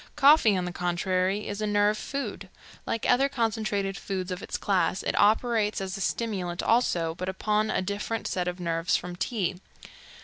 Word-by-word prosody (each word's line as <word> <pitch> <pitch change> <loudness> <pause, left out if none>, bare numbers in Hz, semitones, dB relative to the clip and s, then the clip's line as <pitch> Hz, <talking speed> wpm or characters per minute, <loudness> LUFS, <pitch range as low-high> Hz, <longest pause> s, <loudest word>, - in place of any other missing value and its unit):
Coffee, 280 -8 +6
on 180 - -1
the 180 - -3
contrary, 185 +3 0
is 205 +1 -4
a 215 - 0
nerve 205 0 +3
food. 215 -5 -5 0.4
Like 230 - -1
other 270 +3 +4
concentrated 215 -6 -1
foods 190 -2 -4
of 180 +1 -4
its - - -4
class, 190 -1 0
it - - -1
operates 215 0 +2
as 190 -1 -4
a 195 - -6
stimulant 190 -6 -2
also, 175 -9 +2
but 185 +2 -4
upon 210 +3 0
a 185 - 0
different 205 +3 -3
set 180 -1 -2
of 180 0 -3
nerves 165 -1 0
from 180 0 -7
tea. 185 -1 -2
200 Hz, 175 wpm, -27 LUFS, 180-220 Hz, 0.4 s, Coffee